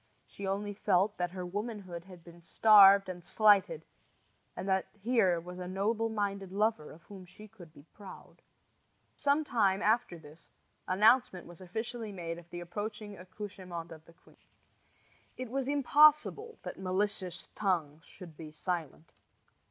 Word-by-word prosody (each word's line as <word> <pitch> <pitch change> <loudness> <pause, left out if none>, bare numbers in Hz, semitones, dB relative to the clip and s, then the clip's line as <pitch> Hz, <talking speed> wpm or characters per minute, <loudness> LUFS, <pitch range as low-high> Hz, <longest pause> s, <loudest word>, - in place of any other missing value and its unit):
She 200 - -8
only 205 +1 -2
felt 200 0 +1
that 175 0 0
her 180 0 -6
womanhood 195 -3 -6
had 180 -3 -14
been 170 0 -15
starved 200 +1 +6
and 180 -1 -7
slighted, 215 - +3 0.7
and - - -6
that 190 -1 +1
here 200 -6 +2
was 180 +2 -9
a 180 - -6
noble 215 +5 -1
minded 200 -3 -3
lover 205 -6 0
of 165 +2 -15
whom 195 0 -12
she 185 +4 -14
could 185 -7 -15
be 145 -2 -17
proud. 200 -2 -13 0.7
Some 290 +2 +1
time 200 -8 +1
after 215 -5 +1
this 155 +1 -16 0.4
announcement 210 0 +3
was 175 +1 -14
officially 220 +4 -5
made 170 -3 -6
of 170 0 -18
the 175 0 -7
approaching 205 +3 -6
accouchement 185 -3 -8
of 160 -1 -11
the 170 - -18
queen. 170 - -24 1.0
It 255 -2 -6
was 270 0 -2
impossible 300 - +3
that - - -7
malicious 190 -1 -3
tongues 165 -7 -2
should 175 -4 -13
be 155 0 -9
silent. 160 -1 -5
195 Hz, 150 wpm, -31 LUFS, 175-215 Hz, 1.0 s, starved